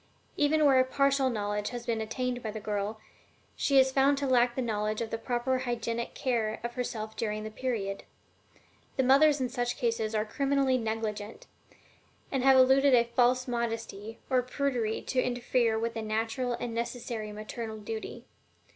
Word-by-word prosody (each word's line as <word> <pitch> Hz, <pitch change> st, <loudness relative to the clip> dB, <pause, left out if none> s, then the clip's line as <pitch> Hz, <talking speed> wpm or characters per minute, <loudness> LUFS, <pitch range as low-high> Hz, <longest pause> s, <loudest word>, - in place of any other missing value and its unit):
Even 300 Hz, +1 st, +3 dB
where 270 Hz, -2 st, +6 dB
a -, -, +6 dB
partial 275 Hz, 0 st, +2 dB
knowledge 210 Hz, -2 st, -2 dB
has 240 Hz, -1 st, -6 dB
been 230 Hz, -2 st, -1 dB
attained 250 Hz, +2 st, -3 dB
by 220 Hz, -, -4 dB
the 215 Hz, +1 st, -5 dB
girl, 210 Hz, 0 st, -3 dB, 0.6 s
she 275 Hz, -, +2 dB
is 265 Hz, 0 st, +6 dB
found 275 Hz, +1 st, +3 dB
to 280 Hz, -, -1 dB
lack 245 Hz, -2 st, +3 dB
the 260 Hz, -, -1 dB
knowledge 215 Hz, -2 st, -1 dB
of 225 Hz, -1 st, -4 dB
the 225 Hz, -, -1 dB
proper 245 Hz, +2 st, -1 dB
hygienic 235 Hz, -2 st, -3 dB
care 230 Hz, -5 st, -1 dB
of 235 Hz, 0 st, -4 dB
herself 220 Hz, -3 st, -4 dB
during 215 Hz, -1 st, -2 dB
the 215 Hz, -, -6 dB
period. 210 Hz, -5 st, -3 dB, 0.9 s
The 265 Hz, -, +3 dB
mothers 280 Hz, +3 st, +5 dB
in 255 Hz, -, 0 dB
such 245 Hz, 0 st, -2 dB
cases 230 Hz, -3 st, -1 dB
are 215 Hz, 0 st, +1 dB
criminally 275 Hz, +1 st, +1 dB
negligent, 220 Hz, -1 st, -4 dB, 0.9 s
and 270 Hz, -2 st, 0 dB
have 270 Hz, 0 st, +6 dB
alluded 265 Hz, +1 st, +6 dB
a 235 Hz, -, +5 dB
false 250 Hz, +1 st, +3 dB
modesty 225 Hz, -3 st, -4 dB
or 255 Hz, -2 st, +3 dB
prudery 250 Hz, -4 st, -2 dB
to 255 Hz, -, 0 dB
interfere 245 Hz, -2 st, +1 dB
with 230 Hz, +1 st, -2 dB
a 225 Hz, -, -2 dB
natural 225 Hz, +4 st, -1 dB
and 235 Hz, 0 st, -4 dB
necessary 230 Hz, -2 st, -4 dB
maternal 220 Hz, +1 st, -6 dB
duty. 220 Hz, +1 st, -6 dB
240 Hz, 170 wpm, -29 LUFS, 220-260 Hz, 0.9 s, where